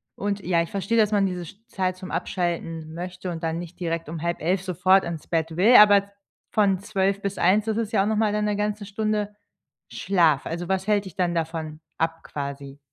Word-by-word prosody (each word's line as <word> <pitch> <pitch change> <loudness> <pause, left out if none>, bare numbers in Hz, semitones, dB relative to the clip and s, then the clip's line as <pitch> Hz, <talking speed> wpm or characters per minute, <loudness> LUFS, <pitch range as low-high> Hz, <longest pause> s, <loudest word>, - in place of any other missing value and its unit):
und 205 0 -2
ja, 175 -2 +1
ich 170 - -4
verstehe, 200 +4 -1
dass 215 -1 +3
man 205 -2 +3
diese 180 -2 -3
sch 180 - -12
Zeit 185 -1 -2
zum 185 0 -8
Abschalten 165 -3 -3
möchte 180 +2 -6
und 165 -1 -6
dann 165 0 -1
nicht 175 0 -9
direkt 165 -2 -3
um 160 -1 -5
22:30 170 +2 0
sofort 185 +1 +3
ins 170 -2 -6
Bett 165 -1 -1
will, 220 +7 +6
aber 205 -2 +8
v 200 - -17 0.5
von 200 -3 +3
12 200 -1 0
bis 200 -1 -3
1, 190 +5 +3
das 220 -1 -1
ist 225 -1 -2
ja 195 - +4
auch - - -1
nochmal 215 0 +1
dann 210 0 0
1 210 -1 0
ganze 210 0 -2
Stunde 210 0 -2 0.6
Schlaf. 170 -7 +2
Also, 170 +2 -4
was 190 0 -1
hält 205 -1 +2
dich 185 - -10
dann 180 -2 0
davon 160 -1 -3 0.2
ab 165 0 -1
quasi? 140 -1 -6
185 Hz, 215 wpm, -24 LUFS, 165-205 Hz, 0.6 s, aber